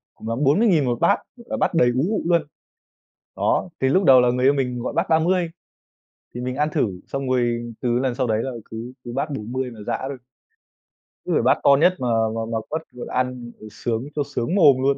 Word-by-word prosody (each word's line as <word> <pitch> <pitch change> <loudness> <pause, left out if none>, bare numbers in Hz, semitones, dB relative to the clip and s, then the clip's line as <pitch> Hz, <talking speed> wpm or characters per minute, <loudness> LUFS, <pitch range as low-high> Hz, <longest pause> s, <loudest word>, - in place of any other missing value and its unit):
cùng - - -10
lắm 115 - -2
40.000 160 - +4
1 120 -2 -1
bát, - - +4 0.3
và 275 - -2
bát - - 0
đầy 125 -7 +4
ú 130 - +2
ụ 220 - 0
luôn. 170 -1 +3 0.9
Đó, - - 0
cái 130 - +2
lúc 190 +7 +3
đầu 130 -5 +7
là 125 - +3
người 125 +1 0
yêu 140 - +6
mình 125 -3 -1
gọi 120 - -4
bát - - 0
30, 170 +2 +2 0.9
thì 120 - -5
mình 125 +1 -3
ăn 150 +1 +1
thử 100 - -1
xong 135 -1 -4
rồi 120 -2 0
từ 120 -1 +1
lần 130 -1 0
sau 130 0 -1
đấy 110 0 0
là 135 - -3 0.2
cứ 115 +3 -7
cứ 120 - -6
bát 140 +4 -2
40 130 0 -4
mà 115 - -12
giã - - -1
thôi. 135 -2 -6 1.1
Cứ - - -3
phải - - +3
bát - - +3
to 140 - +7
nhất 180 +3 +5
mà 125 - -2 0.3
mà 115 - -2
mà 115 - 0
quất, 160 +1 -2
vừa 125 - -8
ăn 125 -1 -3
vừa 110 - -9
sướng 115 +3 -3
vừa 145 - +1
sướng 140 +11 -1
mồm 145 -9 +6
luôn. 140 +1 +2
130 Hz, 230 wpm, -22 LUFS, 120-145 Hz, 1.1 s, đầu